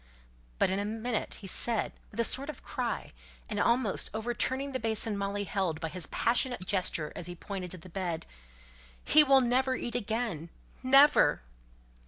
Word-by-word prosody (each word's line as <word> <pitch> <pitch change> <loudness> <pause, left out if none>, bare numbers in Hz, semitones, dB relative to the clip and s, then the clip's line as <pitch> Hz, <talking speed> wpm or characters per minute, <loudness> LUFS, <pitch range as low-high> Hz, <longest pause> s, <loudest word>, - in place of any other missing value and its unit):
But - - +2
in 190 - 0
a - - -1
minute 225 +2 -3
he - - -9
said, 225 +4 +1 0.2
with - - -10
a - - +4
sort 275 +5 0
of 305 - -8
cry, - - -3 0.4
and 205 - -3
almost 235 -1 +2
overturning 255 +4 -1
the 260 - -2
basin 220 -1 0
Molly 200 +1 -2
held, 185 -5 -2
by 160 0 -3
his 180 0 -2
passionate 240 -3 +1
gesture 180 -6 0
as 170 - -5
he 175 - -7
pointed 185 0 -6
to 185 - -5
the 170 - -13
bed, 175 -3 -4 0.8
"He 305 - +6
will 270 -2 +5
never 255 +1 +1
eat 240 - -5
again 220 -8 -3 0.3
never." 275 - +5
220 Hz, 170 wpm, -30 LUFS, 185-250 Hz, 0.8 s, He